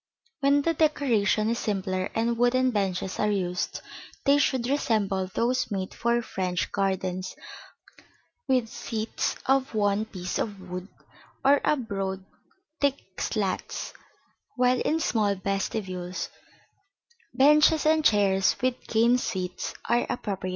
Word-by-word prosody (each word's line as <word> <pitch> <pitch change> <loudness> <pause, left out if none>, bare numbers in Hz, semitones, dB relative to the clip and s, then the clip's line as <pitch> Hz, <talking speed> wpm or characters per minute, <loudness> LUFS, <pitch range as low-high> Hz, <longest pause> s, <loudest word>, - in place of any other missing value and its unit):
When 285 0 +3
the 330 - +2
decoration 235 -9 +2
is 235 - -1
simpler 190 -2 -1
and 230 +1 +1
wooden 255 +2 +3
benches 190 -3 -2
are 210 - +2
used, 180 -3 -2 0.4
they 280 +1 +5
should 260 -4 +1
resemble 210 -8 0
those 245 +6 0
made 190 -3 -3
for 235 0 0
French 180 -4 -2
gardens, 185 -1 -1 1.1
with 255 -3 +2
seats 225 -1 -3
of 270 -2 +1
one 205 0 +2
piece 185 -4 -4
of 205 -3 -3
wood, 180 0 -7 0.6
or 280 +1 +6
of 270 -5 0
broad 195 -2 -3 0.5
thick 275 -9 -2
slats; 200 -4 -2 0.6
while 250 0 +3
in 320 - +1
small 210 -9 +1
vestibules, 190 -2 -3 1.0
benches 300 +4 +5
and 310 0 +4
chairs 195 -5 +3
with 255 0 0
cane 235 +2 +3
seats 185 -6 -3
are 240 0 +2
appropriate. 195 -5 -3
215 Hz, 125 wpm, -27 LUFS, 190-255 Hz, 1.1 s, or